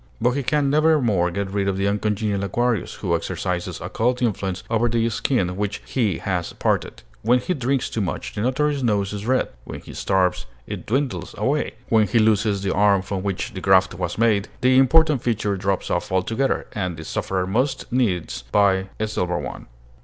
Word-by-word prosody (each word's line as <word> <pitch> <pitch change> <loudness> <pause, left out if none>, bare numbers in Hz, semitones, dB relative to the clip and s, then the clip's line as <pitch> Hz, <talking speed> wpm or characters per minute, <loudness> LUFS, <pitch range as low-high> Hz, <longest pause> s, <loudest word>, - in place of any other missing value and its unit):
But 120 +2 +3
he 140 +3 -1
can 140 +1 +1
nevermore 140 - +3
get 95 +2 -3
rid 100 -1 0
of 95 -1 0
the 100 +1 +1
uncongenial 105 0 0
Aquarius, 120 +1 0
who - - -1
exercises 90 -2 -3
occult 125 +2 -1
influence 95 -6 -1
over 115 +1 +1
the 115 0 +1
skin 110 -1 +1
with 90 - -6
which 105 0 -2
he 110 -10 0
has 90 -4 -2
parted. - - -1 0.2
When 120 +3 +4
he 125 +9 -1
drinks 135 -2 0
too 110 - -3
much, 90 - -3
the 105 - -3
Notary's 140 +4 +1
nose 105 -4 0
is 105 +2 -5
red; 130 +1 +2
when - - -7
he - - -11
starves, 90 -9 0 0.2
it - - -7
dwindles 135 +3 -1
away; 145 +3 0 0.2
when 110 -2 +4
he 115 - +1
loses 110 -2 +2
the 95 - 0
arm 100 -1 +3
from 95 -1 -3
which 100 -1 -3
the - - -6
graft - - +4
was - - -3
made, 110 -3 +2
the 130 0 +4
important 150 +1 +4
feature 105 -4 0
drops 95 0 -1
off 85 - -1
altogether, 115 +8 0
and 90 -5 -3
the 80 - -7
sufferer 95 +2 -2
must 125 +8 0
needs 105 - 0
buy 95 -2 +3
a 110 - 0
silver 90 -4 -1
one. - - -6
105 Hz, 190 wpm, -22 LUFS, 95-125 Hz, 0.2 s, When